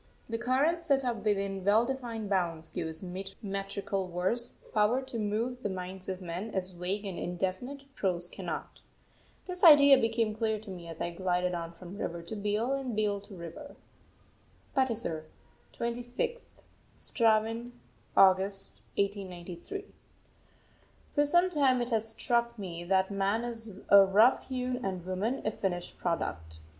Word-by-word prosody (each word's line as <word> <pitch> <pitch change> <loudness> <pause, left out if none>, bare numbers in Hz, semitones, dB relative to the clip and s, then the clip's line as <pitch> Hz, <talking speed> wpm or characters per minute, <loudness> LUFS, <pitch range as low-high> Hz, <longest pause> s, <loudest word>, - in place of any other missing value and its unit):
The 230 0 -3
current 275 +8 +2
set 275 -5 +2
up 240 -2 0
within 200 -2 0
well 210 +4 +5
defined 240 -4 -4
bounds 170 -5 0
gives 160 +2 -2
metrical 195 +1 -4
verse 190 +8 -1 0.2
power 215 +4 +3
to 250 -3 -5
move 225 +4 -1
the 205 - -1
minds 185 0 -5
of 185 0 -4
men 180 +5 -4
as 185 -1 -1
vague 185 +4 -3
and 190 -3 -4
indefinite 190 +10 -3
prose 175 -6 -1
cannot. - - -6 0.7
This 360 0 -5
idea 285 -4 +9
became 225 -2 +1
clear 220 0 0
to 215 -3 -9
me 175 -2 -8
as 165 -1 -8
I 175 - -1
glided 180 0 0
on 170 -1 -3
from 180 +3 -10
river 170 0 -3
to 170 - -6
beel 210 +5 0
and 265 -4 -2
beel 205 -2 +1
to 200 - -11
river. 170 - -9 1.0
PATISAR, 225 - 0 0.5
26th 245 - -3 0.5
(Straven) 225 0 +1 0.5
August 195 +1 +4 0.2
1893. 195 - -3 1.3
For 290 -1 +3
some 350 +4 +4
time 275 -5 +3
it 240 0 -2
has 225 0 +1
struck 235 +1 0
me 175 -4 -5
that 190 +1 +2
man 200 +3 +1
is 225 -4 -4
a 200 -1 +10
rough 210 +6 +4
hewn 255 -1 -2
and 185 -3 -3
woman 195 +8 -1
a 215 - +2
finished 180 -4 -3
product. 80 - -2
205 Hz, 145 wpm, -31 LUFS, 185-240 Hz, 1.3 s, a